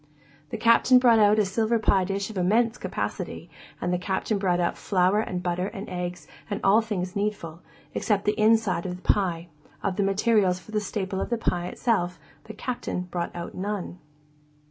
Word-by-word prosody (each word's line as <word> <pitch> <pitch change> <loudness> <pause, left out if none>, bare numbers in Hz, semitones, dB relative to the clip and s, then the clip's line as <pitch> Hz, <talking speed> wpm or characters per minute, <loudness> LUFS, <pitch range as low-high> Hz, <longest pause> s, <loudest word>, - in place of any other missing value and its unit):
The - - -4
Captain 230 +3 +5
brought 240 -3 +5
out 210 0 +5
a 210 - +3
silver 220 +4 +1
pie 195 -4 +2
dish 195 +2 -3
of 210 - -8
immense 220 +6 +2
capacity, - - -4 0.3
and 180 - -1
the 180 - 0
Captain 195 +3 -1
brought 180 -3 +1
out 175 - 0
flour 190 +1 +2
and 180 -4 -3
butter 180 +1 -1
and 205 0 -7
eggs 180 -1 -5 0.2
and 205 -1 -2
all 205 +4 +5
things 185 -5 -4
needful, 200 -6 -3 0.3
except 205 -2 0
the 210 - +4
inside 215 -4 +2
of 180 - -4
the 180 - -13
pie; 175 -4 0 0.3
of 195 0 -2
materials 195 -1 +2
for 200 - -14
the 210 -1 0
staple 190 -1 -3
of - - -3
the 235 - 0
pie 175 -5 -1
itself, 180 -5 -1 0.3
the 220 - -8
Captain 240 -5 -3
brought 175 -1 -2
out 170 0 -6
none. 190 -2 -4
195 Hz, 185 wpm, -26 LUFS, 180-215 Hz, 0.3 s, Captain